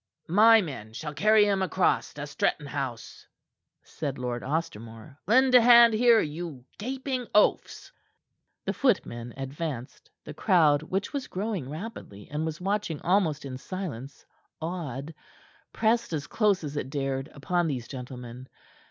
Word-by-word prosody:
"My 220 Hz, +4 st, +6 dB
men 110 Hz, -9 st, -8 dB
shall 150 Hz, +5 st, -6 dB
carry 210 Hz, +7 st, +4 dB
him 200 Hz, -2 st, +1 dB
across 190 Hz, 0 st, +1 dB
to 145 Hz, 0 st, -5 dB
Stretton 145 Hz, 0 st, -1 dB
House," 135 Hz, -5 st, -6 dB, 0.6 s
said 140 Hz, -4 st, -5 dB
Lord 125 Hz, -1 st, -3 dB
Ostermore. 135 Hz, -3 st, -5 dB
"Lend 255 Hz, +4 st, +4 dB
a 250 Hz, -, +9 dB
hand 235 Hz, -1 st, +8 dB
here, 230 Hz, 0 st, +5 dB
you 150 Hz, -, -5 dB
gaping 255 Hz, +1 st, -3 dB
oafs." 210 Hz, -, +2 dB, 0.7 s
The -, -, -1 dB
footmen 120 Hz, -, 0 dB
advanced. 135 Hz, -2 st, -6 dB
The -, -, -8 dB
crowd, 155 Hz, -7 st, +3 dB
which 190 Hz, -, -3 dB
was 280 Hz, -2 st, -3 dB
growing 190 Hz, -, -3 dB
rapidly 155 Hz, -, -8 dB
and 155 Hz, +2 st, -2 dB
was 160 Hz, 0 st, -5 dB
watching 195 Hz, -4 st, -2 dB
almost 170 Hz, -6 st, +1 dB
in 130 Hz, -2 st, -6 dB
silence, 140 Hz, -8 st, -7 dB, 0.3 s
awed, 160 Hz, -4 st, -5 dB, 0.6 s
pressed 230 Hz, -3 st, +1 dB
as 150 Hz, -2 st, -2 dB
close 205 Hz, -5 st, +1 dB
as 145 Hz, -1 st, -5 dB
it 130 Hz, -, -3 dB
dared 135 Hz, 0 st, -3 dB
upon 175 Hz, +4 st, 0 dB
these 125 Hz, -6 st, -3 dB
gentlemen. 125 Hz, -1 st, -8 dB
160 Hz, 140 wpm, -27 LUFS, 135-205 Hz, 0.7 s, a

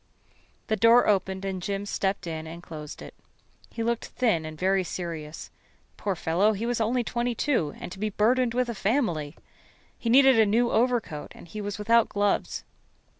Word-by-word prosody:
The 220 Hz, -, 0 dB
door 230 Hz, +3 st, +5 dB
opened 190 Hz, -1 st, +1 dB
and 190 Hz, -2 st, -3 dB
Jim 200 Hz, +2 st, -3 dB
stepped 195 Hz, -1 st, -1 dB
in 160 Hz, -1 st, -5 dB
and 170 Hz, +2 st, -9 dB
closed 150 Hz, -3 st, -8 dB
it. -, -, -10 dB, 0.6 s
He 230 Hz, -, -4 dB
looked 235 Hz, 0 st, -1 dB
thin 210 Hz, -11 st, 0 dB
and 155 Hz, 0 st, -8 dB
very 190 Hz, +2 st, +2 dB
serious. 165 Hz, -3 st, -6 dB, 0.4 s
Poor 200 Hz, -2 st, -2 dB
fellow, 180 Hz, +6 st, +2 dB
he 215 Hz, +3 st, -3 dB
was 240 Hz, -1 st, -1 dB
only 240 Hz, +3 st, +1 dB
twenty 240 Hz, +1 st, -2 dB
two 220 Hz, -, 0 dB
and -, -, -7 dB
to 190 Hz, -, -9 dB
be 215 Hz, +1 st, -1 dB
burdened 235 Hz, +4 st, +2 dB
with 250 Hz, 0 st, +1 dB
a 235 Hz, -, -3 dB
family! 195 Hz, -, -1 dB, 0.6 s
He 230 Hz, -, -2 dB
needed 265 Hz, 0 st, +6 dB
a 220 Hz, -, +6 dB
new 235 Hz, +3 st, +2 dB
overcoat 230 Hz, -11 st, 0 dB
and -, -, -13 dB
he 210 Hz, +6 st, -6 dB
was 205 Hz, 0 st, -4 dB
without 230 Hz, +2 st, +3 dB
gloves. 205 Hz, 0 st, 0 dB
205 Hz, 180 wpm, -26 LUFS, 175-235 Hz, 0.6 s, needed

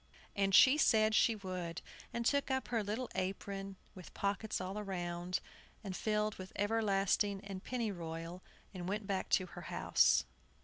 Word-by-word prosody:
And 195 Hz, -1 st, +3 dB
she 275 Hz, +4 st, +8 dB
said 215 Hz, -5 st, +4 dB
she 225 Hz, +1 st, +4 dB
would, 185 Hz, -4 st, -5 dB, 0.3 s
and 235 Hz, 0 st, -3 dB
took 280 Hz, +3 st, +2 dB
up 265 Hz, 0 st, -1 dB
her 230 Hz, -3 st, 0 dB
little 215 Hz, +5 st, -2 dB
old 245 Hz, -, -8 dB
apron, 195 Hz, +1 st, -3 dB, 0.2 s
with 185 Hz, -4 st, -12 dB
pockets 200 Hz, +2 st, -1 dB
all 190 Hz, +3 st, -4 dB
round, 175 Hz, -2 st, -2 dB, 0.5 s
all 195 Hz, -, -3 dB
filled 210 Hz, +2 st, 0 dB
with 185 Hz, 0 st, -8 dB
everlasting 205 Hz, -1 st, +1 dB
and 195 Hz, -2 st, -6 dB
pennyroyal, 175 Hz, -7 st, -4 dB, 0.3 s
and 180 Hz, -1 st, -5 dB
went 210 Hz, +1 st, -2 dB
back 195 Hz, -1 st, -2 dB
to 185 Hz, -, +3 dB
her 175 Hz, -, -10 dB
house. -, -, +3 dB
195 Hz, 160 wpm, -35 LUFS, 185-215 Hz, 0.5 s, she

